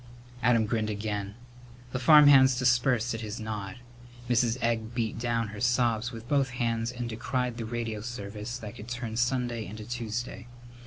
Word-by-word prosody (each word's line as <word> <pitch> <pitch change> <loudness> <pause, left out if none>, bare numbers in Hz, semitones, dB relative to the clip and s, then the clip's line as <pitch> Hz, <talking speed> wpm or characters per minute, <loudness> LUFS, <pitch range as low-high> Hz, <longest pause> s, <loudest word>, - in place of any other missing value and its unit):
Adam 115 -2 +4
grinned 110 0 -1
again. 105 -1 -3 0.6
The 130 - -2
farmhands 135 -2 +7
dispersed 125 -2 +2
at 115 - -4
his 110 0 -5
nod. 105 -3 -5 0.5
Mrs. 120 0 +2
Egg 115 -1 -1
beat 115 -2 -2
down 115 -2 -1
her 105 0 -8
sobs 120 -1 +1
with 115 -1 -9
both 140 -1 +2
hands 115 -1 0
and 120 -1 -5
decried 125 +1 -2
the 115 - -4
radio 115 -2 -3
service 105 0 -6
that 105 -4 -9
could 105 - -9
turn 120 -2 -4
Sunday 120 -1 0
into 110 +1 -8
Tuesday. 120 +1 -4
115 Hz, 160 wpm, -28 LUFS, 110-125 Hz, 0.6 s, farmhands